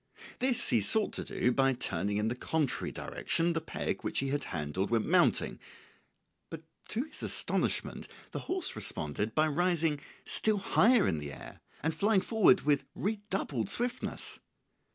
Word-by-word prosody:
This 255 Hz, -1 st, +2 dB
he 115 Hz, -, +3 dB
sought 210 Hz, -, +1 dB
to -, -, -3 dB
do 125 Hz, -, 0 dB
by 135 Hz, +1 st, +3 dB
turning 100 Hz, -3 st, -1 dB
in 105 Hz, +1 st, 0 dB
the 115 Hz, -, 0 dB
contrary 145 Hz, +2 st, -1 dB
direction 170 Hz, +1 st, 0 dB
the 165 Hz, -, -1 dB
peg -, -, -4 dB
which -, -, -3 dB
he 135 Hz, -, 0 dB
had 145 Hz, +1 st, -1 dB
handled 80 Hz, +4 st, -3 dB
when 115 Hz, -2 st, +1 dB
mounting, -, -, +2 dB, 0.9 s
but 165 Hz, -1 st, -8 dB, 0.2 s
to 235 Hz, -, -1 dB
his 305 Hz, 0 st, -8 dB
astonishment -, -, 0 dB, 0.2 s
the -, -, -4 dB
horse 370 Hz, -1 st, +1 dB
responded 105 Hz, +9 st, -3 dB
by 155 Hz, 0 st, +3 dB
rising 165 Hz, -1 st, +1 dB, 0.3 s
still 215 Hz, -1 st, +3 dB
higher 215 Hz, +3 st, +4 dB
in 80 Hz, -, 0 dB
the 75 Hz, -1 st, -6 dB
air -, -, -11 dB, 0.2 s
and 160 Hz, +1 st, +1 dB
flying 200 Hz, +4 st, +2 dB
forward 210 Hz, -3 st, +4 dB
with 145 Hz, -1 st, +1 dB
redoubled 195 Hz, -, -2 dB
swiftness. 245 Hz, +1 st, -1 dB
155 Hz, 155 wpm, -31 LUFS, -, 0.9 s, higher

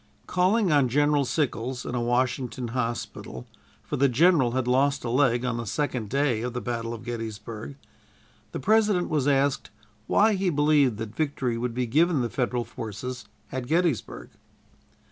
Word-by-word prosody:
Calling 185 Hz, +2 st, +2 dB
on 140 Hz, -4 st, +4 dB
General 145 Hz, +2 st, +2 dB
Sickles, 125 Hz, -3 st, -2 dB
in -, -, -4 dB
a 125 Hz, -, -1 dB
Washington 125 Hz, 0 st, -1 dB
hospital 115 Hz, -, -4 dB, 0.4 s
for -, -, -4 dB
the 140 Hz, +1 st, +4 dB
general 135 Hz, -2 st, +4 dB
had 130 Hz, -1 st, -1 dB
lost 135 Hz, +3 st, +2 dB
a 115 Hz, -, -2 dB
leg 125 Hz, -2 st, +2 dB
on 120 Hz, -1 st, -1 dB
the 115 Hz, -2 st, -5 dB
second 125 Hz, -3 st, -2 dB
day 135 Hz, -4 st, +1 dB
of 125 Hz, 0 st, -3 dB
the 125 Hz, -, -2 dB
battle 115 Hz, -1 st, -3 dB
of 115 Hz, -1 st, -7 dB
Gettysburg 115 Hz, +1 st, -6 dB, 0.8 s
the -, -, -4 dB
President 210 Hz, +1 st, +2 dB
was 145 Hz, -3 st, 0 dB
asked 140 Hz, -1 st, +1 dB, 0.4 s
why 215 Hz, +1 st, +4 dB
he 190 Hz, -1 st, 0 dB
believed 145 Hz, -6 st, +3 dB
that 110 Hz, -1 st, -6 dB
victory 140 Hz, -6 st, -1 dB
would 115 Hz, 0 st, -3 dB
be 125 Hz, 0 st, 0 dB
given 155 Hz, +5 st, +2 dB
the 120 Hz, -, -2 dB
Federal 125 Hz, -2 st, -1 dB
forces 115 Hz, +2 st, -6 dB, 0.3 s
at 130 Hz, -2 st, -4 dB
Gettysburg. 165 Hz, -4 st, -1 dB
130 Hz, 165 wpm, -26 LUFS, 120-145 Hz, 0.8 s, on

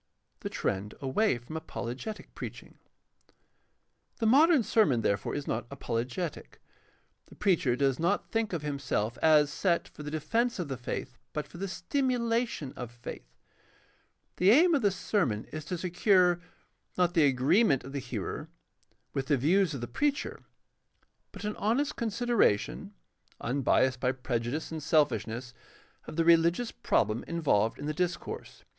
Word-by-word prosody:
The -, -, -4 dB
trend 100 Hz, +2 st, -2 dB
away 140 Hz, -, +1 dB
from 120 Hz, +7 st, -10 dB
apologetic 160 Hz, -, -6 dB
preaching. -, -, -9 dB, 0.7 s
— -, -, -46 dB
The 225 Hz, -, 0 dB
modern 285 Hz, +4 st, +6 dB
sermon, 155 Hz, -, +3 dB
therefore, 100 Hz, -2 st, 0 dB
is 145 Hz, -, -3 dB
not 120 Hz, +1 st, -2 dB
apologetic. 130 Hz, +5 st, -4 dB, 0.7 s
The -, -, -15 dB
preacher 170 Hz, -11 st, +2 dB
does 135 Hz, -1 st, +1 dB
not 170 Hz, +1 st, 0 dB
think 225 Hz, -1 st, 0 dB
of 165 Hz, -4 st, -3 dB
himself 135 Hz, -6 st, -2 dB
as 150 Hz, -2 st, +5 dB
set 175 Hz, -3 st, +1 dB
for -, -, -12 dB
the 150 Hz, -, -5 dB
defense 230 Hz, +11 st, 0 dB
of 175 Hz, -6 st, -3 dB
the 135 Hz, -, -3 dB
faith 125 Hz, +1 st, -5 dB
but 150 Hz, -1 st, -3 dB
for 170 Hz, -, -12 dB
the 195 Hz, -, -2 dB
stimulation 235 Hz, -, -1 dB
of 125 Hz, -2 st, -6 dB
faith. 120 Hz, -, -9 dB, 1.1 s
The 185 Hz, -, +4 dB
aim 330 Hz, -, +6 dB
of 285 Hz, -, +3 dB
the 205 Hz, -, +4 dB
sermon 165 Hz, -, -1 dB
is 155 Hz, -1 st, -6 dB
to 180 Hz, +1 st, -3 dB
secure, 180 Hz, 0 st, +3 dB, 0.6 s
not 175 Hz, -1 st, +2 dB
the 160 Hz, -5 st, +5 dB
agreement 135 Hz, -, +3 dB
of 135 Hz, -, -9 dB
the 140 Hz, -, -2 dB
hearer 120 Hz, -6 st, -5 dB, 0.6 s
with 135 Hz, -1 st, -2 dB
the 145 Hz, -, +3 dB
views 165 Hz, +4 st, +2 dB
of 130 Hz, -, -5 dB
the 120 Hz, -, -4 dB
preacher, 285 Hz, -, -1 dB, 0.9 s
but 200 Hz, -, -10 dB
an 210 Hz, 0 st, -2 dB
honest 240 Hz, +8 st, 0 dB
consideration, 230 Hz, -, 0 dB, 0.4 s
unbiased 130 Hz, 0 st, +1 dB
by 125 Hz, 0 st, +1 dB
prejudice 125 Hz, +3 st, -3 dB
and 160 Hz, -1 st, -4 dB
selfish 145 Hz, -, +2 dB
ness, 120 Hz, +3 st, -6 dB, 0.5 s
of -, -, -7 dB
the 165 Hz, 0 st, +1 dB
religious 170 Hz, +7 st, +4 dB
problem 105 Hz, +2 st, 0 dB
involved 115 Hz, -10 st, +1 dB
in 145 Hz, -, -6 dB
the 155 Hz, -, -1 dB
discourse. 180 Hz, +2 st, -4 dB
155 Hz, 150 wpm, -30 LUFS, 125-200 Hz, 1.1 s, modern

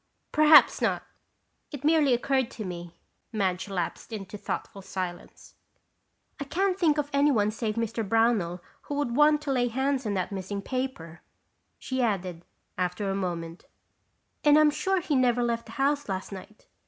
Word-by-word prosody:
"Perhaps 305 Hz, 0 st, +6 dB
not. -, -, 0 dB, 0.7 s
It 290 Hz, -2 st, -7 dB
merely 305 Hz, -2 st, +4 dB
occurred 260 Hz, 0 st, 0 dB
to 220 Hz, -5 st, -7 dB
me." 175 Hz, -1 st, -7 dB, 0.3 s
Madge 195 Hz, -3 st, -1 dB
lapsed 180 Hz, +3 st, -4 dB
into 210 Hz, -2 st, -6 dB
thoughtful 200 Hz, -1 st, -5 dB
silence. 185 Hz, -2 st, -7 dB, 0.9 s
"I -, -, -2 dB
can't 375 Hz, +6 st, 0 dB
think 325 Hz, -5 st, +2 dB
of 295 Hz, -1 st, 0 dB
anyone 280 Hz, -8 st, +3 dB
save 215 Hz, -1 st, -3 dB
Mr. 230 Hz, -2 st, -2 dB
Brownell 220 Hz, -6 st, +1 dB, 0.3 s
who 290 Hz, -, -2 dB
would 285 Hz, -5 st, -1 dB
want 300 Hz, +1 st, +4 dB
to 285 Hz, -, -2 dB
lay 245 Hz, -2 st, +2 dB
hands 265 Hz, +1 st, -1 dB
on 205 Hz, -, -1 dB
that 185 Hz, +2 st, -2 dB
missing 200 Hz, +1 st, -4 dB
paper," 255 Hz, -12 st, -4 dB, 0.6 s
she 260 Hz, 0 st, -3 dB
added, 185 Hz, -7 st, -1 dB, 0.4 s
after 180 Hz, +2 st, -1 dB
a -, -, -2 dB
moment, 170 Hz, -3 st, -4 dB, 0.8 s
"and 295 Hz, 0 st, +6 dB
I'm 305 Hz, -1 st, +6 dB
sure 380 Hz, +5 st, 0 dB
he 305 Hz, -3 st, -1 dB
never 245 Hz, -2 st, +3 dB
left 235 Hz, -1 st, -2 dB
the 225 Hz, -, -10 dB
house 280 Hz, 0 st, 0 dB
last 190 Hz, +1 st, -4 dB
night. 195 Hz, +2 st, -11 dB
230 Hz, 160 wpm, -27 LUFS, 190-280 Hz, 0.9 s, Perhaps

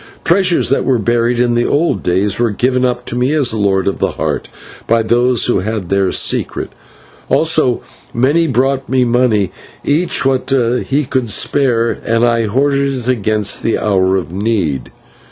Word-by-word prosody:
Treasures 180 Hz, -5 st, +2 dB
that 140 Hz, -, +2 dB
were 130 Hz, -2 st, +1 dB
buried 120 Hz, +2 st, 0 dB
in 120 Hz, -1 st, +2 dB
the 120 Hz, 0 st, +1 dB
old 145 Hz, -, 0 dB
days 95 Hz, +3 st, 0 dB
were 120 Hz, -1 st, +2 dB
given 125 Hz, +4 st, 0 dB
up 125 Hz, -1 st, -1 dB
to -, -, -5 dB
me 125 Hz, +4 st, 0 dB
as 140 Hz, -7 st, +2 dB
Lord 100 Hz, -3 st, 0 dB
of 100 Hz, -, -1 dB
the -, -, -1 dB
Heart -, -, -3 dB, 0.4 s
by 115 Hz, 0 st, +2 dB
those 120 Hz, +1 st, +2 dB
who 120 Hz, -, +1 dB
had 100 Hz, -2 st, -4 dB
their 100 Hz, -1 st, +1 dB
secret; -, -, -1 dB, 0.6 s
also -, -, +2 dB, 0.3 s
many 145 Hz, +8 st, +1 dB
brought 135 Hz, 0 st, 0 dB
me 130 Hz, -1 st, +2 dB
money, 115 Hz, -5 st, +1 dB, 0.3 s
each 155 Hz, 0 st, +1 dB
what 135 Hz, 0 st, 0 dB, 0.4 s
he 145 Hz, +1 st, 0 dB
could 130 Hz, -3 st, -2 dB
spare, 115 Hz, 0 st, +1 dB
and 115 Hz, +1 st, +1 dB
I 115 Hz, -1 st, +1 dB
hoarded 140 Hz, +4 st, 0 dB
it 125 Hz, -2 st, -6 dB
against 110 Hz, -4 st, -1 dB
the 115 Hz, -, 0 dB
hour 95 Hz, -2 st, +1 dB
of 85 Hz, -3 st, -5 dB
need. 95 Hz, -, -2 dB
120 Hz, 170 wpm, -15 LUFS, 105-130 Hz, 0.6 s, Treasures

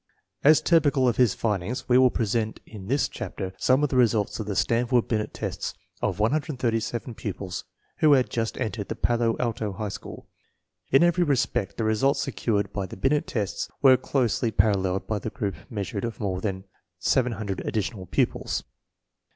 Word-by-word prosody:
1 140 Hz, -, +5 dB
As 155 Hz, -, +6 dB
typical 145 Hz, -6 st, +3 dB
of 120 Hz, -, +1 dB
his 125 Hz, -6 st, +4 dB
findings 105 Hz, +2 st, -2 dB
we 125 Hz, -, +3 dB
will 130 Hz, 0 st, +7 dB
present 110 Hz, -1 st, -1 dB
in 100 Hz, -4 st, -10 dB
this 140 Hz, +4 st, +2 dB
chapter 95 Hz, -1 st, -6 dB
some 130 Hz, +3 st, +3 dB
of 150 Hz, -, +2 dB
the -, -, -2 dB
results 115 Hz, -5 st, +2 dB
of 110 Hz, -, -4 dB
the 100 Hz, -, -2 dB
Stanf 115 Hz, +4 st, +1 dB
ord 120 Hz, -2 st, +3 dB
Binet 110 Hz, -2 st, -1 dB
tests -, -, -4 dB, 0.3 s
of 95 Hz, -3 st, 0 dB
137 120 Hz, -2 st, -1 dB
pupils 95 Hz, -4 st, -5 dB, 0.3 s
who 155 Hz, -2 st, +5 dB
had 130 Hz, -2 st, +3 dB
just 115 Hz, -1 st, -2 dB
entered 110 Hz, -4 st, -3 dB
the -, -, -4 dB
Palo 120 Hz, -1 st, +1 dB
Alto 110 Hz, -4 st, -2 dB
High 105 Hz, +2 st, -4 dB
School. -, -, -9 dB, 0.6 s
In 135 Hz, +5 st, +6 dB
every 175 Hz, +1 st, +3 dB
respect 120 Hz, -, 0 dB
the 115 Hz, -, -1 dB
results 120 Hz, +6 st, +2 dB
secured 105 Hz, -7 st, -1 dB
by 100 Hz, -2 st, -2 dB
the -, -, -9 dB
Binet 145 Hz, +7 st, +1 dB
tests 105 Hz, -5 st, -2 dB
were 130 Hz, -2 st, +8 dB
closely 125 Hz, -3 st, 0 dB
paralleled 95 Hz, -3 st, +1 dB
by 105 Hz, -2 st, -2 dB
the 110 Hz, -, -4 dB
group 100 Hz, -2 st, -3 dB, 0.2 s
meas 100 Hz, -4 st, -4 dB
urements 100 Hz, 0 st, -3 dB
of -, -, -25 dB
more 95 Hz, -3 st, -2 dB
than 95 Hz, -2 st, -3 dB, 0.3 s
700 110 Hz, -4 st, 0 dB
additional 105 Hz, -3 st, -3 dB
pupils. -, -, 0 dB
115 Hz, 180 wpm, -26 LUFS, 100-130 Hz, 0.6 s, were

